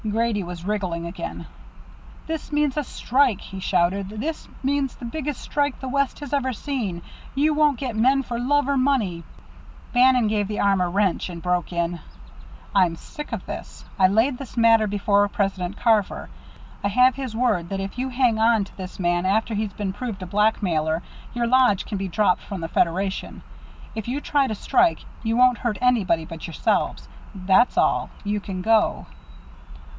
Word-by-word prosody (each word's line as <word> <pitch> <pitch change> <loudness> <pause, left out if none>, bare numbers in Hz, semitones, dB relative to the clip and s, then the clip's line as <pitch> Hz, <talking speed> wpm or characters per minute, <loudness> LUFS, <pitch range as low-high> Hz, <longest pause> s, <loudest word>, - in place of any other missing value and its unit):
Grady 225 -1 0
was 175 -1 -7
wriggling 185 -5 -2
again. 170 +2 -6 0.8
"This 320 -1 -5
means 295 -2 +1
a 300 - 0
strike!" 255 -4 +1
he 195 - -9
shouted. 185 +1 +1
"This 255 +10 -4 0.2
means 275 -1 0
the 245 - -9
biggest 295 +3 -4
strike 285 -2 -1
the 265 - -6
West 280 +1 0
has 290 -1 -6
ever 260 -2 0
seen! 215 - -4 0.3
You 300 +3 +3
won't 300 -3 +3
get 250 -4 -4
men 265 +5 +3
for 235 -1 -4
love 285 +3 +2
or 280 -1 +1
money 235 -11 +1 0.3
" - - -21
Bannon 250 -2 +5
gave 210 -1 0
the 210 0 -4
arm 195 -2 +3
a 180 - +1
wrench, 190 0 0
and 170 -1 -7
broke 180 0 -1
in: 170 0 -1 0.7
"I'm 180 -4 +3
sick 300 - -9
of - - -4
this. - - -8
I 185 - +7
laid 225 +7 +2
this 265 -2 -9
matter 225 -2 +5
before 205 0 +2
President 195 -2 -2
Carver. 220 -4 +1 0.5
I - - +2
have 250 +5 +4
his 255 -3 -5
word 220 -8 +1
that 195 - -3
if 195 0 -5
you 260 +1 -1
hang 245 -3 +2
on 225 -1 +4
to 195 - -13
this 185 -1 -8
man 175 0 +1
after 220 +3 +1
he's 210 -1 -1
been 195 -1 -3
proved 205 -3 -5
a - - -5
blackmailer, 175 -5 +1 0.3
your 240 0 +1
lodge 250 -5 +3
can 205 -3 -4
be 195 - -2
dropped 185 0 +2
from 195 -4 -6
the 165 - -3
Federation. 190 +4 -1 0.5
If 220 -1 -5
you 260 +4 -1
try 285 -2 +1
to 220 - -3
strike, 165 -4 +2 0.2
you 225 0 0
won't 250 -1 +5
hurt 235 -5 -1
anybody 215 -10 +2
but 165 -1 -8
yourselves. 165 - -1 0.3
That's 190 +6 +3
all. - - +2
You 205 0 -1
can 190 -2 -6
go." 220 0 +2
215 Hz, 180 wpm, -23 LUFS, 190-255 Hz, 0.8 s, I